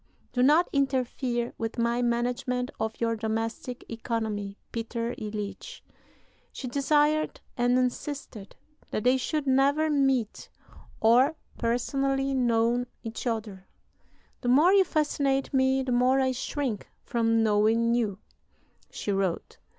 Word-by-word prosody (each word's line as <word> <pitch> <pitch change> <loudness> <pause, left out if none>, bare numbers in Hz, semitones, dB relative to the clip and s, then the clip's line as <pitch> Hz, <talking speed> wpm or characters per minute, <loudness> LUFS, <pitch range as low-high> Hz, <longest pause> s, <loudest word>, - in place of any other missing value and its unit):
Do 250 - +1
not 300 +7 +5
interfere 255 -3 0
with 225 +1 -3
my 235 +1 +1
management 245 +2 -1
of 220 0 -3
your 230 -1 +1
domestic 225 +2 -3
economy, 220 -3 -3
Peter 230 +1 -3
Iljitsch." 210 - -6 0.7
She 260 - -6
desired 295 +4 +1 0.2
and 245 0 +2
insisted 255 -4 -3 0.3
that 215 - -2
they 255 +1 +4
should 300 +3 -2
never 280 +4 +3
meet 270 -6 0 0.5
or 245 +7 +5 0.2
personally 270 +3 0
know 240 -1 +2 0.2
each 225 +2 -5
other; 215 -5 -4 0.7
"the 245 - -1
more 305 +9 +6
you 390 -1 +6
fascinate 280 -4 0
me, 265 0 +3
the 255 - -3
more 250 +2 +3
I 260 -1 +2
shrink 255 -3 -3 0.2
from 225 -1 +2
knowing 220 +2 +3
you," 220 -5 0 0.7
she 205 - -4
wrote. 195 -3 -2
245 Hz, 120 wpm, -27 LUFS, 225-270 Hz, 0.7 s, more